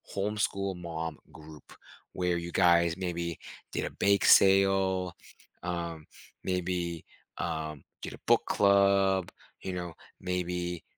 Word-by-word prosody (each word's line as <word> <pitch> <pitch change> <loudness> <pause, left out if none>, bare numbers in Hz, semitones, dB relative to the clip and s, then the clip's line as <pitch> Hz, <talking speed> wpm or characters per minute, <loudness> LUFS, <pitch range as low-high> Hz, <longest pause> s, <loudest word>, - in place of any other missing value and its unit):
homeschool-mom 95 -6 -2
group 75 -1 -13 0.4
where 90 -1 0
you 85 0 -5
guys 85 -2 +4
maybe 85 -3 -3 0.4
did - - -1
a - - -4
bake 100 0 +3
sale, 95 -2 +5 0.5
um, 85 -3 -4 0.4
maybe, 90 -2 -2 0.3
um, 80 -3 -4 0.2
get - - -6
a - - -12
book - - +5
club, 100 -2 +3 0.3
you 95 - -4
know, 90 -2 -5 0.3
maybe, 90 -1 -3
90 Hz, 110 wpm, -29 LUFS, 85-95 Hz, 0.5 s, sale